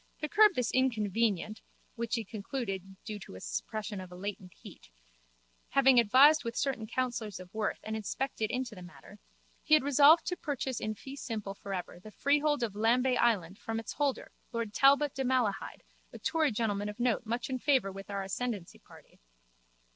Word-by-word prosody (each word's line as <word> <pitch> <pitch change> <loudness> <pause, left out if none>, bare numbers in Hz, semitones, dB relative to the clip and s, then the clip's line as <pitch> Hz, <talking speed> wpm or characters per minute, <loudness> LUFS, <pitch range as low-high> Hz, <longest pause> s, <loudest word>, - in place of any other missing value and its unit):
To 305 - -3
curb 425 +1 +5
this 250 -2 0
inconvenient 220 -4 0 0.3
(which 235 0 -2
he 230 - -2
concluded 195 -3 -5
due 215 -2 -5
to 195 - -11
a - - -8
suppression 210 - -4
of 185 - -9
latent 185 -1 -6
heat), - - -14 0.8
having 270 -2 +5
advised 270 +7 +6
with 230 -1 -4
certain 265 -6 -1
counsellors 235 -4 -3
of 185 0 -12
worth 220 -1 -1
and 220 0 -4
inspected 220 +1 -3
into 250 -1 -3
this 180 -3 -10
matter, 185 +3 -14 0.4
he 310 - +5
had 305 - +3
resolved 285 +4 +6
to 360 - -1
purchase 270 -6 -3
in 215 0 -3
fee 270 +5 -9
simple 215 -7 -5
for 200 0 -9
ever 180 -2 -5
the 215 - -11
freehold 290 +3 +1
of 220 -4 -2
Lambay 245 +4 +2
island 200 -6 +1
from 225 0 -3
its 225 - -6
holder, 285 -3 -1 0.2
lord 230 -3 -3
Talbot 280 +2 +4
de 270 - -2
Malahide, 245 -6 -1 0.3
a - - -9
Tory 315 -3 +1
gentleman 210 -2 -1
of 210 +3 -9
note 240 -1 +1
much 235 +2 -2
in 260 -1 -3
favour 260 -8 +2
with 195 +1 -10
our 200 -1 -3
ascendancy 200 -1 -4
party. - - -18
230 Hz, 180 wpm, -31 LUFS, 205-265 Hz, 0.8 s, advised